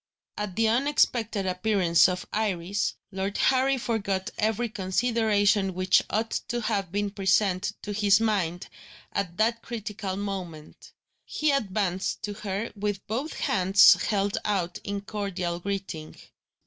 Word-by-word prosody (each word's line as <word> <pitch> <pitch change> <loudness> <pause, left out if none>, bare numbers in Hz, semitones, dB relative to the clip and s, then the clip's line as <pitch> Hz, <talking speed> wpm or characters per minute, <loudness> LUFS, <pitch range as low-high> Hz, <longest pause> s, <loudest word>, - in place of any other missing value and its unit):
At 210 -3 -4
the 225 +1 +2
unexpected 235 -4 +1
appearance 185 -2 +3
of 180 0 -3
Iris, 200 -2 -1 0.2
Lord 195 +1 -3
Harry 265 +1 +3
forgot 205 -5 -2
every 220 +2 +1
consideration 205 -1 +1
which 185 +1 +4
ought 225 +2 -1 0.2
to 240 - -2
have 200 -5 -1
been 205 +1 -1
present 195 -1 +1
to 205 - -4
his 205 0 +4
mind, 190 -6 -1 0.5
at 175 -3 -2
that 230 +2 +1
critical 210 -5 -5
moment. 185 -6 -6 0.3
He 305 -1 0
advanced 195 -7 -1
to 205 - -3
her 205 +1 -4
with 205 -1 -3
both 260 +9 -3
hands 190 0 +6
held 200 -1 0
out 185 -4 -1
in 200 0 -3
cordial 195 -4 -3
greeting. 190 -5 -5
200 Hz, 130 wpm, -27 LUFS, 190-220 Hz, 0.5 s, hands